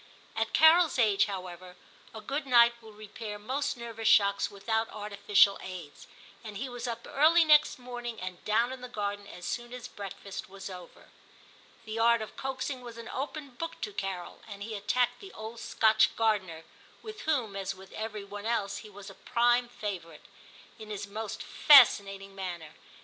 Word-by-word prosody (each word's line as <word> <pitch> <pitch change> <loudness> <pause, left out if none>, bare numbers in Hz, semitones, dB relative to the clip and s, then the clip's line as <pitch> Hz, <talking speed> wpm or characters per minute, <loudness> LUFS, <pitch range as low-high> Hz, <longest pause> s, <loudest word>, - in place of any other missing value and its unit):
At 225 0 -1
Carol's 320 -1 +6
age, 215 -5 +4
however, 185 -2 -7 0.4
a 220 - -9
good 280 +3 -3
night 235 -2 +6
will 220 -1 -13
repair 210 0 -8
most 260 +7 -2
nervous 230 -2 -5
shocks 200 -1 +4
without 220 +3 -1
artificial 205 -1 +3
aids, 180 -6 -9 0.4
and 215 -3 -7
he 265 +6 -3
was 245 0 -6
up 235 0 -5
early 325 +4 +5
next 300 0 +5
morning, 245 -2 -7
and 185 -1 -7
down 230 +4 +2
in 260 - -9
the 250 - -8
garden 205 -3 -4
as 180 - -10
soon 240 0 -4
as 250 -1 -7
breakfast 200 -3 -8
was 195 0 -8
over. 180 -1 -12 0.8
The 220 +1 -4
art 235 0 +4
of 215 - -10
coaxing 265 0 -4
was 240 -2 -10
an 230 -1 -8
open 285 +1 -5
book 330 +7 -6
to 210 - -4
Carol, 195 -3 -5
and 200 -2 -8
he 220 +1 -6
attacked 235 +4 0
the 390 -1 -12
old 220 +2 -8
Scotch 220 -1 +3
gardener, 195 -8 0 0.2
— - - -27
with 435 -1 -8
whom, 240 -10 0
as 195 0 -3
with 190 0 -14
every 215 -1 -5
one 205 +2 -7
else, 210 -4 -1
he 215 - -10
was 200 0 -11
a - - -13
prime 240 +3 +2
favourite, 190 -8 -6 0.3
— - - -22
in 215 -1 -10
his 205 -1 -4
most 210 +1 -6
fascinating 200 -8 +5
manner. 175 -5 -6
220 Hz, 180 wpm, -29 LUFS, 200-245 Hz, 0.8 s, Carol's